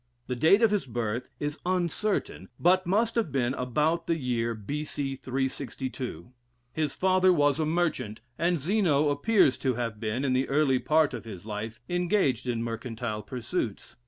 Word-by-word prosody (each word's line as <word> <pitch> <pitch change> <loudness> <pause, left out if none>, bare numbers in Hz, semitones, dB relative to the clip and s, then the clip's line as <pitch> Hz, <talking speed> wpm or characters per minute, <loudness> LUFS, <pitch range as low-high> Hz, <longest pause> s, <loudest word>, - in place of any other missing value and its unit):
The 125 - -3
date 160 - +5
of 225 - +5
his 205 -9 0
birth 115 0 -3
is 145 +1 -3
uncertain, 180 - -1
but 185 +2 +3
must 220 +5 +2
have 225 -10 0
been 130 -2 +1
about 150 +7 0
the 165 - +2
year 120 -4 -1
B.C. 140 +4 -3
362. 130 -1 -4 0.4
His 155 -3 -1
father 185 0 +4
was 145 -3 +3
a 155 - +1
merchant, 155 -10 -1 0.2
and 170 0 +1
Zeno 155 -3 +2
appears 145 - +3
to 130 -2 0
have 115 -3 -3
been, 115 +5 -2
in 130 - +2
the 130 +1 +1
early 135 -2 +3
part 155 0 +3
of 120 -2 -6
his 100 -4 -9
life, 110 +2 -5
engaged 175 - +1
in 115 -2 -1
mercantile 115 -1 -4
pursuits. 120 - -4
135 Hz, 160 wpm, -28 LUFS, 120-170 Hz, 0.4 s, date